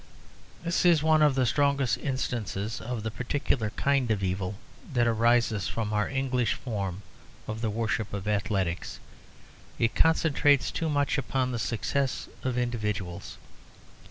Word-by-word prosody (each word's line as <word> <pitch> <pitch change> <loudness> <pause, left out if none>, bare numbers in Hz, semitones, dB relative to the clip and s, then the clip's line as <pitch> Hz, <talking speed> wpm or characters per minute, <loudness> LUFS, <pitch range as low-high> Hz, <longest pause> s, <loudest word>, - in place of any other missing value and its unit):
This 170 0 +1
is 170 -4 +5
one 155 0 +4
of 150 -3 +5
the 130 -1 +2
strongest 140 0 +2
instances 115 -6 -3
of 115 -2 -4
the 110 - -2
particular 125 -2 -1
kind 135 +2 +1
of 105 -3 0
evil 95 +1 -1 0.4
that 120 -2 +3
arises 115 -2 +2
from 110 -2 -2
our 105 0 +1
English 130 -3 0
form 100 -5 -4 0.4
of 110 +1 -4
the 115 - 0
worship 110 0 -1
of 100 0 -5
athletics. 100 -4 -1 0.8
It 115 -1 +1
concentrates 145 -3 +3
too 165 - -2
much 145 -1 +1
upon 130 -1 -1
the 120 - -2
success 120 +7 -1
of 130 -1 -2
individuals. 105 -7 -3
120 Hz, 140 wpm, -28 LUFS, 105-135 Hz, 0.8 s, is